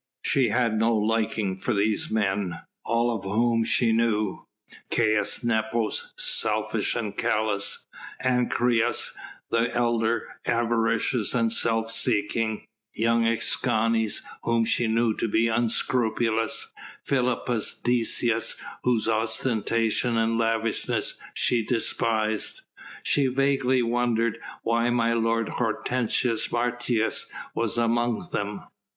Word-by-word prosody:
She 130 -4 +2
had 115 -1 +1
no 115 0 +3
liking 110 -2 0
for 95 - -1
these 105 +1 0
men, 100 -4 -1 0.2
all 115 0 +1
of 100 - -6
whom 115 +4 +1
she 115 +1 +2
knew. 110 -3 0 0.4
Caius 110 -1 +1
Nepos, 110 -1 0
selfish - - +1
and 105 -4 -3
callous; 105 -2 0 0.4
Ancyrus, 120 -2 +1 0.4
the 115 0 +1
elder, 115 -1 +1 0.2
avaricious 115 0 +1
and 115 -2 +2
self 115 -1 +1
seeking; 110 -1 0 0.3
young 115 +1 +2
Escanes 115 -1 +1 0.2
whom 115 -1 +1
she 115 +1 +1
knew 115 0 +2
to 115 - -2
be 115 +2 +2
unscrupulous; 115 -1 0 0.3
Philippus 125 -3 0
Decius 120 -1 +1 0.3
whose 120 -3 +1
ostentation 115 +1 0
and 115 0 +1
lavishness 115 -1 0 0.2
she 120 -2 +2
despised. 110 -2 -1 0.4
She 140 -2 +2
vaguely 130 -1 +2
wondered 115 -1 0 0.2
why 115 +1 +1
my 115 -1 +2
lord 115 -1 +1
Hortensius 115 0 -1
Martius 120 -1 0 0.3
was 115 0 -1
among 120 +6 0
them. 100 0 -3
115 Hz, 105 wpm, -25 LUFS, 110-120 Hz, 0.4 s, no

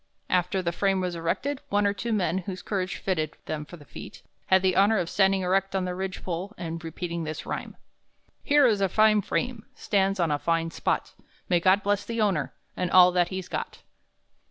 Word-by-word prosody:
After 180 +1 +1
the 170 - 0
frame 195 +2 +1
was 180 -1 -2
erected, 255 +12 -2
one 205 0 +2
or 200 - +2
two 230 +3 -4
men, 190 -3 +1
whose 185 0 -6
courage 190 -2 -2
fitted 160 -5 -2
them 150 -1 -4
for 175 - -11
the 145 - -15
feat, - - -11 0.2
had 190 0 +4
the 185 -1 +2
honor 205 +3 +4
of 175 -3 -2
standing 195 -1 +3
erect 195 +1 0
on 190 -1 0
the 180 - -3
ridge 190 +1 -5
pole 185 +4 -4
and 165 -1 -5
repeating 170 +1 -4
this 155 0 -5
rhyme: - - -5 0.6
'Here 290 -1 +4
is 215 -5 +3
a 195 - +2
fine 215 +1 +4
frame, 245 +2 -2
Stands 195 -1 0
on 170 -3 +2
a 145 - 0
fine 165 0 0
spot; - - -2 0.4
May 175 -2 +4
God 190 +3 +3
bless 205 0 +1
the 230 0 -4
owner, 195 -9 +1 0.2
And 180 -1 -1
all 180 0 +7
that 175 -1 +2
he's 185 -1 -5
got.' - - -5
185 Hz, 205 wpm, -26 LUFS, 170-200 Hz, 0.6 s, all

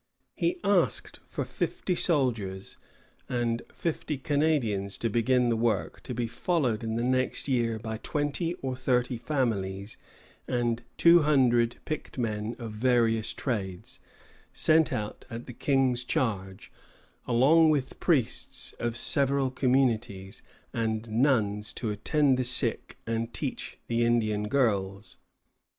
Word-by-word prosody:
He 350 +1 0
asked 200 -3 +1
for - - -4
fifty 185 - -2
soldiers 115 - 0 0.5
and 120 -1 0
fifty 155 -3 -3
Canadians 130 -9 0
to 115 - -1
begin 120 +2 +2
the 115 - +2
work, 115 0 -1
to 125 - -6
be 120 0 -1
followed 120 -1 -1
in 110 0 -2
the 115 - -1
next 130 +2 0
year 120 -4 +1
by 110 0 -5
twenty 150 +6 -2
or 130 -1 -2
thirty 125 -1 0
families 105 -8 -2 0.5
and 120 -2 0
by 120 - -17
two 170 0 +7
hundred 125 -6 +3
picked 155 -3 -5
men 110 -1 -2
of 115 -3 -6
various 115 -1 +2
trades, 95 -8 -4 0.5
sent 160 -1 +3
out 105 -5 -4
at 115 0 -7
the 125 - -9
King's 130 -1 +1
charge, 105 -9 -2 0.6
along 145 +7 +5
with 140 -4 -1
priests 140 -10 0
of 120 0 -2
several 140 -1 +1
communities, 120 -7 0 0.3
and 110 -1 -2
nuns 110 -4 +1
to 110 -4 -3
attend 135 +5 +2
the - - +2
sick 125 0 +2
and 115 0 -3
teach - - -4
the 120 0 0
Indian 110 -3 +1
girls. 100 -5 0
120 Hz, 130 wpm, -28 LUFS, 110-135 Hz, 0.6 s, two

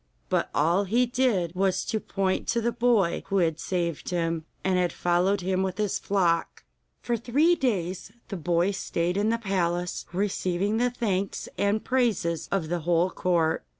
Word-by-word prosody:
But - - +1
all 170 +7 +3
he 235 +6 +2
did 235 -9 +1
was 190 0 0
to 220 - -1
point 195 -2 -1
to 235 - +1
the 235 +1 0
boy 230 -6 +2
who 195 - 0
had 165 -3 +1
saved 170 -4 -2
him, 165 -2 -1 0.2
and 185 -1 +2
had 180 -1 +1
followed 180 +3 +1
him 185 +1 0
with 190 -1 -2
his 210 -2 0
flock. 175 -4 0 0.4
For 240 - 0
three 270 +9 +3
days 190 - -1 0.2
the 200 - -4
boy 175 +3 +1
stayed 175 -2 -2
in 205 +2 +1
the 230 - +1
palace, 180 -5 -1
receiving 195 +1 0
the 245 +1 +2
thanks 200 -6 -2
and 205 +2 +1
praises 225 -10 0
of 190 -5 0
the 175 0 -1
whole 170 +2 +1
court. 170 -3 +1
190 Hz, 170 wpm, -26 LUFS, 175-215 Hz, 0.4 s, all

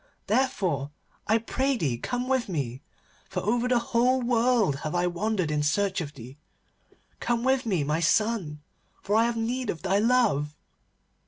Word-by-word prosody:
Therefore 195 - 0 0.4
I 220 - +4
pray 265 +4 -1
thee 130 - -1
come 245 - -3
with 260 -4 0
me, 135 -7 -3 0.5
for 185 -1 -3
over 235 +5 +1
the 250 -1 +3
whole 240 +2 +2
world 235 - +2
have 155 +3 -4
I 175 0 +2
wandered 180 -1 -1
in 150 -1 0
search 190 +5 +1
of 150 -2 -7
thee. 130 +3 -11 0.8
Come 240 -1 -1
with 265 -1 +1
me, 185 -8 +1
my 150 +3 0
son, 180 -5 0 0.4
for 205 - 0
I 225 +1 +5
have 235 0 -1
need 240 +1 -2
of 165 - -4
thy 195 +1 +2
love. 210 - +2
205 Hz, 165 wpm, -27 LUFS, 150-240 Hz, 0.8 s, I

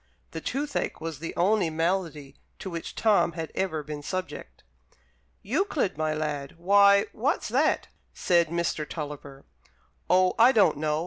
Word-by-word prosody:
(The - - -6
toothache 285 +2 -3
was 160 -2 -6
the 165 - -6
only 190 0 +2
malady 160 -4 -2 0.2
to 190 - -7
which 165 -1 -6
Tom 210 -6 +2
had 165 -1 -6
ever 160 -6 -2
been 150 0 -7
subject.) 185 +5 -6 0.8
"Euclid, 315 - -1
my 155 0 -1
lad; 150 -2 -4
why, 200 +3 +5
what's 285 - -1
that?" - - +1 0.2
said 170 -2 +2
Mr. 155 -2 -2
Tulliver. 145 -3 -7 0.6
"Oh, 185 0 +4
I 240 +3 +7
don't 205 - +4
know. 155 0 -1
170 Hz, 140 wpm, -26 LUFS, 150-200 Hz, 0.8 s, I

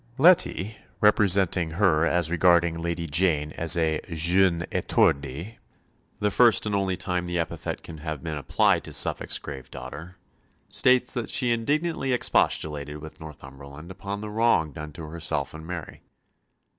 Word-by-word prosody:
Leti, 135 - +3 0.2
representing 95 -4 +3
her 85 -4 +3
as 85 -2 +1
regarding 85 -1 +3
Lady 85 0 -3
Jane 75 -2 +1
as 85 +2 +2
a 80 -2 0
jeune 85 +2 +2
étourdie 70 - 0 0.6
the 105 0 0
first 120 +1 +4
and 105 - -2
only 95 -2 0
time 90 -1 -2
the 90 0 -2
epithet 85 - -4
can 80 -2 -10
have 80 -3 -6
been 80 -2 -4
applied 70 - +1
to - - -6
Suffolk's - - +1
grave 70 -3 -9
daughter 75 +8 -9 0.5
states 125 0 +2
that 120 -3 -3
she 125 -2 +1
indignantly 140 +4 -1
expostulated 75 - 0
with 80 +1 -11
Northumberland 70 +1 -11
upon 100 +2 -6
the 105 0 -6
wrong 105 -8 +2
done 75 +2 -8
to 80 - -9
herself 75 -3 -3
and 80 +1 -10
Mary. 85 -3 -7
85 Hz, 145 wpm, -25 LUFS, 75-100 Hz, 0.6 s, first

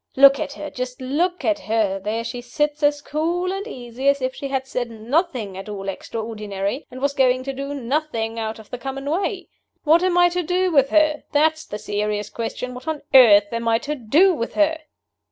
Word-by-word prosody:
Look 275 0 +7
at 280 - -3
her 300 0 -7
just 250 0 -5
look 325 +8 -1
at 310 -1 +2
her! 215 -6 0
There 215 +4 -2
she 245 +1 -5
sits 295 +4 -2
as 290 0 +2
cool 345 +5 -1
and 395 +3 -5
easy 250 - -5
as 280 0 +2
if 260 0 -2
she 275 - -5
had 265 -1 -2
said 250 -2 -3
nothing 235 - -1
at 195 +2 -8
all 195 -1 -6
extraordinary, 210 +2 -4
and 255 - -9
was 280 +1 0
going 255 -2 +2
to 275 +1 -4
do 275 +2 -5
nothing 240 -4 -2
out 220 0 -3
of 220 -2 -15
the 250 - -5
common 270 +2 -5
way! 375 +4 -1 0.4
What 325 +3 +5
am 365 -1 +1
I 350 0 +6
to 355 +1 -1
do 360 +2 0
with 275 -3 +4
her? 310 -1 +3
that's 315 +2 +2
the 210 - -5
serious 210 0 -2
question 245 +2 -4
what 250 +5 -10
on 315 -2 -3
earth 210 -5 +7
am 230 0 -2
I 225 0 +4
to 290 +5 -4
do 300 - +3
with 230 -8 -4
her?" 315 +1 +2
265 Hz, 210 wpm, -22 LUFS, 230-305 Hz, 0.4 s, Look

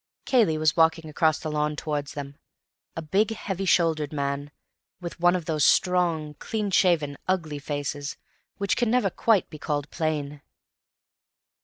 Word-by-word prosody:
Cayley 220 -12 +3
was 155 0 +2
walking 160 -1 +3
across 155 0 +2
the 155 - -5
lawn 150 0 0
towards 145 -2 -3
them, 140 -1 -6 0.6
a 165 - -4
big, 195 +7 +2
heavy 195 -2 -4
shouldered 160 -5 +2
man, 140 -1 -2 0.5
with 175 -2 -7
one 175 +1 +4
of 175 -3 -3
those 155 -3 0
strong, 170 -5 +2
clean 210 -3 -3
shaven, 160 -7 +2
ugly 160 -6 -1
faces 145 0 -4 0.4
which 200 -1 0
can 240 -3 +1
never 235 -5 +2
quite 220 -6 +2
be 155 - -9
called 145 -1 -3
plain. 150 -3 -2
155 Hz, 150 wpm, -26 LUFS, 150-180 Hz, 0.6 s, one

